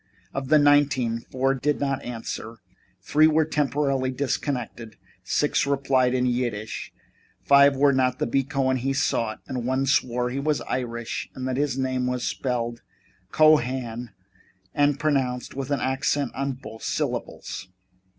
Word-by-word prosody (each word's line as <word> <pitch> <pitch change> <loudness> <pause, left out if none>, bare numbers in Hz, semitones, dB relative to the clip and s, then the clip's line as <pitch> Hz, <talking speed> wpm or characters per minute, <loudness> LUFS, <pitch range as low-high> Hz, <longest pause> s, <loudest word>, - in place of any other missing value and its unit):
Of 135 -1 -3
the 155 +3 +5
nineteen, 145 -5 +3
four 130 +3 -1
did 145 +2 -1
not 135 -1 -1
answer, 115 -1 -6 0.5
three 155 +8 +4
were 160 0 +3
temporarily 140 -3 0
disconnected, 125 -4 -3 0.3
six - - +1
replied 135 -2 +2
in 125 0 +1
Yiddish, 120 -4 -2 0.5
five 140 0 +6
were 140 +1 +4
not 130 -1 +1
the - - 0
B. 135 +3 +1
Cohen 130 -2 0
he 135 +2 -1
sought, 115 -5 -1
and 125 -2 -3
one 130 +2 0
swore 125 -2 +1
he 135 - -2
was 150 -1 0
Irish 120 -1 -4
and 130 0 -4
that 130 -1 -1
his 145 -2 0
name 130 -1 -1
was 125 -1 -2
spelled 120 -2 -2 0.5
Cohan 125 -6 +2 0.6
and 145 -1 +2
pronounced 135 -5 0
with 135 0 -5
an 140 - 0
accent 135 +1 0
on 135 0 -2
both 110 -3 -11
syllables. 90 - -3
130 Hz, 145 wpm, -25 LUFS, 125-140 Hz, 0.6 s, five